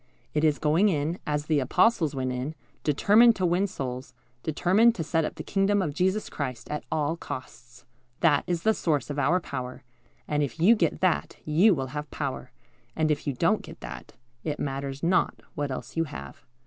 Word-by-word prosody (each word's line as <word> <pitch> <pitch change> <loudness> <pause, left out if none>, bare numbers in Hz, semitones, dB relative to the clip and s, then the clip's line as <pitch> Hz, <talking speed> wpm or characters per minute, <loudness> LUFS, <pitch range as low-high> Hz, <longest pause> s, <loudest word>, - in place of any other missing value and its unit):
It 150 - +1
is 150 -2 +3
going 160 +7 +3
in, 160 +1 -1
as 150 0 -1
the 155 -2 +2
Apostles 155 - +2
went 130 -1 -1
in, 130 +5 -4 0.3
determined 215 - +5
to 185 - 0
win 180 +3 +2
souls, 130 -6 -6 0.3
determined 190 - +3
to 165 - -2
set 160 0 +1
up - - -5
the - - -6
kingdom 200 +1 +1
of 160 -7 -1
Jesus 190 +6 0
Christ, 130 -4 -5
at 150 - -3
all 155 +1 0
costs. 125 -5 -9 0.4
That 150 -4 +4
is 175 -2 -1
the 220 - +4
source 150 - -1
of 145 - -3
our 165 +7 +3
power, 130 -6 -6 0.4
and 150 0 0
if 145 +2 -3
you 200 +8 +6
get - - 0
that, 185 -3 +1
you 175 +7 +5
will 135 -2 -3
have 150 0 -4
power, 135 -3 -4 0.5
and 155 -1 +1
if 150 - -2
you 140 - +1
don't 125 - +2
get - - -12
that, - - -8 0.3
it 150 -2 -2
matters 135 0 -4
not 180 +2 +2
what 145 -1 -2
else 130 - -6
you 165 0 +1
have. 70 - -9
150 Hz, 195 wpm, -27 LUFS, 140-180 Hz, 0.5 s, you